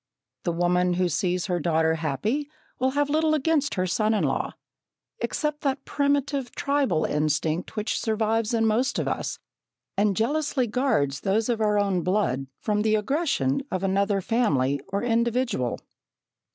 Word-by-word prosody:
The 175 - +1
woman 175 +1 +2
who 180 +1 +1
sees 180 +2 0
her 180 -3 -1
daughter 160 0 +2
happy 165 - -2 0.3
will 260 +1 +2
have 290 0 +2
little 310 0 +3
against 300 0 +1
her 185 -1 0
son 215 +4 +1
in - - +1
law, - - -1 0.7
except 300 -1 -2
that 275 -2 -1
primitive, 280 -2 0
tribal 275 - +1
instinct 155 +3 -1
which 215 0 -1
survives 220 0 0
in 225 -1 +2
most 240 +6 +1
of - - -1
us, - - -2 0.6
and 200 -1 +2
jealously 280 +2 +1
guards 215 - 0
those 215 +4 0
of 230 -2 0
our 210 -1 +2
own 200 -3 +1
blood 175 -9 0
from 210 -1 0
the 215 0 +2
aggression 215 - 0
of 185 0 -2
another 195 +1 +1
family 145 - +1
or 200 +2 -2
individual. 235 - 0
215 Hz, 150 wpm, -25 LUFS, 175-260 Hz, 0.7 s, little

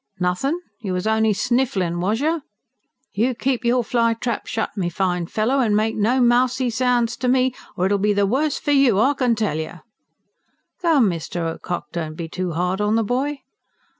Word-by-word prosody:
"Nothin'? 185 - 0 0.2
You 200 -6 -4
was 180 +1 -2
only 220 0 +2
snifflin', 210 -7 0
was 210 +7 0
you? 320 +2 0 0.7
You 240 +5 +1
keep 255 0 -1
your 240 +1 +2
fly 230 0 +1
trap 235 -1 -3
shut, 220 - -2
my 185 -4 -1
fine 180 -1 -1
fellow, 230 +9 0
and 220 -5 +2
make 220 +1 0
no 230 +5 +2
mousy 250 +1 +2
sounds 240 -1 +1
to 250 - -2
me, 255 0 +3 0.2
or 180 - +1
it'll 200 +1 +2
be 210 +2 +2
the 200 0 +2
worse 275 +8 0
for 290 - -2
you, 270 -8 +4
I 270 +6 +4
can 250 -4 +1
tell 215 -7 -1
you!" 160 +3 -6 1.0
"Come, 315 -10 +4
Mr. 170 -1 -3
Ocock, 175 -4 -5
don't 160 -2 -4
be 165 0 -5
too 180 +1 -3
hard 180 +4 -1
on 210 +1 +2
the 225 - +2
boy." 270 +6 -2
225 Hz, 190 wpm, -21 LUFS, 185-255 Hz, 1.0 s, you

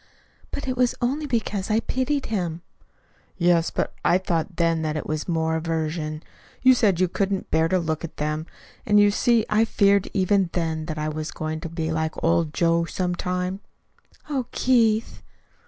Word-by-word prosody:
"But 285 - -5
it 255 - -1
was 250 -1 +2
only 280 +5 -1
because 215 -6 -2
I 215 +1 +3
pitied 260 +4 -1
him." 175 -6 -3 0.7
"Yes; 170 -2 +3
but - - -2
I 175 - +4
thought 175 -1 -2
then 165 -1 +1
that 155 -1 -1
it - - -4
was 155 0 -3
more 160 -2 0
aversion. 155 -1 -2 0.4
You 260 0 +8
said 205 -8 +2
you 185 - +3
couldn't 195 +2 -2
bear 160 0 +3
to 185 - +2
look 160 -2 -2
at 170 - -7
them. 150 +2 -2 0.4
And 210 0 +4
you 205 0 +5
see 230 +1 +2
I 215 +1 +3
feared, 200 -3 +3
even 195 -1 +2
then, 160 -2 -2
that 155 -2 -4
I 155 0 -2
was 155 +1 -4
going 155 0 -4
to 165 0 -6
be 160 -1 -3
like 160 0 -1
old 165 -1 +2
Joe 170 +1 +2
some 180 +1 -2
time." 180 +1 -2 0.7
"Oh, 265 -5 -2
Keith!" 230 -3 +2
175 Hz, 180 wpm, -24 LUFS, 160-210 Hz, 0.7 s, You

